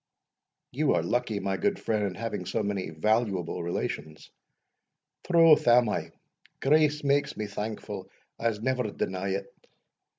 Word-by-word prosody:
"You 145 Hz, +3 st, +2 dB
are -, -, +1 dB
lucky, 115 Hz, -4 st, -1 dB
my 95 Hz, -1 st, -1 dB
good 205 Hz, -1 st, 0 dB
friend, 110 Hz, -8 st, -1 dB
in 95 Hz, -, -6 dB
having 115 Hz, -6 st, -4 dB
so 95 Hz, -, -1 dB
many 100 Hz, -3 st, -2 dB
valuable 95 Hz, +1 st, 0 dB
relations." 80 Hz, -3 st, -4 dB, 1.0 s
"Troth 165 Hz, -5 st, +6 dB
am 120 Hz, -1 st, +6 dB
I -, -, -2 dB, 0.5 s
Grace 150 Hz, +1 st, +3 dB
make 140 Hz, 0 st, +1 dB
me 110 Hz, -, -2 dB
thankful, 105 Hz, +2 st, -5 dB, 0.3 s
I'se 115 Hz, -2 st, -1 dB
never 125 Hz, -3 st, 0 dB
deny 95 Hz, -1 st, -3 dB
it. 95 Hz, +1 st, -2 dB
110 Hz, 135 wpm, -28 LUFS, 95-130 Hz, 1.0 s, Troth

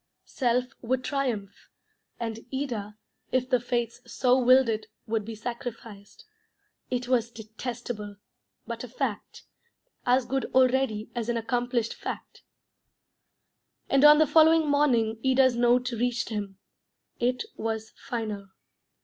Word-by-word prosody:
Self 250 Hz, -1 st, +1 dB, 0.2 s
would 255 Hz, +2 st, -1 dB
triumph, 240 Hz, -9 st, -3 dB, 0.5 s
and 225 Hz, -1 st, -3 dB
Ida, 230 Hz, -7 st, -4 dB, 0.3 s
if 255 Hz, -1 st, +1 dB
the 255 Hz, -2 st, +3 dB
fates 240 Hz, -1 st, -2 dB
so 250 Hz, -1 st, +3 dB
willed 255 Hz, +1 st, +6 dB
it, 215 Hz, -1 st, -2 dB, 0.2 s
would 220 Hz, -1 st, -1 dB
be 225 Hz, +1 st, -7 dB
sacrificed. 225 Hz, -3 st, -8 dB, 0.6 s
It 250 Hz, -1 st, -2 dB
was 240 Hz, -2 st, +2 dB
detestable, 220 Hz, -1 st, -6 dB, 0.5 s
but -, -, -5 dB
a -, -, -6 dB
fact; -, -, -4 dB, 0.6 s
as 250 Hz, 0 st, +3 dB
good 270 Hz, +1 st, -1 dB
already 255 Hz, -4 st, +2 dB
as 235 Hz, -1 st, -3 dB
an 235 Hz, -, +1 dB
accomplished 240 Hz, 0 st, -1 dB
fact. -, -, -7 dB, 1.5 s
And 275 Hz, 0 st, +4 dB
on 295 Hz, 0 st, +9 dB
the 310 Hz, -, +5 dB
following 320 Hz, +1 st, +5 dB
morning 240 Hz, -7 st, +2 dB
Ida's 260 Hz, -1 st, +4 dB
note 245 Hz, +1 st, +3 dB
reached 240 Hz, 0 st, -1 dB
him. 205 Hz, -3 st, -4 dB, 0.6 s
It 250 Hz, +1 st, +1 dB
was 220 Hz, 0 st, -3 dB
final. 215 Hz, -6 st, -5 dB
240 Hz, 125 wpm, -27 LUFS, 220-255 Hz, 1.5 s, on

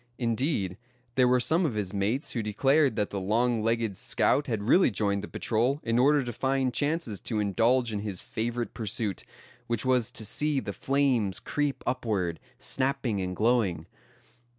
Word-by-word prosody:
Indeed, 115 Hz, -, -1 dB, 0.3 s
there 125 Hz, 0 st, +4 dB
were 125 Hz, 0 st, +4 dB
some 160 Hz, +8 st, +3 dB
of 140 Hz, -10 st, -1 dB
his 105 Hz, -2 st, -3 dB
mates 105 Hz, +8 st, 0 dB
who 120 Hz, -, -2 dB
declared 135 Hz, +7 st, +2 dB
that 105 Hz, -2 st, -1 dB
the 100 Hz, -, -2 dB
long 115 Hz, +4 st, +1 dB
legged 115 Hz, -2 st, 0 dB
scout 145 Hz, +9 st, +1 dB
had 110 Hz, -5 st, -2 dB
really 175 Hz, -, +5 dB
joined 100 Hz, -2 st, 0 dB
the -, -, -5 dB
patrol 120 Hz, +5 st, 0 dB
in 115 Hz, 0 st, +1 dB
order 145 Hz, +2 st, +4 dB
to 120 Hz, -1 st, -5 dB
find 130 Hz, +1 st, 0 dB
chances 145 Hz, -, -1 dB
to 110 Hz, -3 st, -2 dB
indulge 115 Hz, +4 st, +2 dB
in 105 Hz, -, -2 dB
his 100 Hz, -3 st, -4 dB
favorite 120 Hz, 0 st, -3 dB
pursuit, 110 Hz, -3 st, -2 dB, 0.4 s
which 120 Hz, +1 st, -1 dB
was 125 Hz, -2 st, +2 dB
to 110 Hz, -, -5 dB
see 150 Hz, +6 st, +1 dB
the -, -, -5 dB
flames 130 Hz, -9 st, +1 dB
creep 145 Hz, -2 st, -2 dB
upward, 105 Hz, -10 st, -1 dB, 0.2 s
snapping 130 Hz, -6 st, -1 dB
and 90 Hz, 0 st, -3 dB
glowing. 105 Hz, -7 st, +1 dB
115 Hz, 170 wpm, -28 LUFS, 105-130 Hz, 0.4 s, really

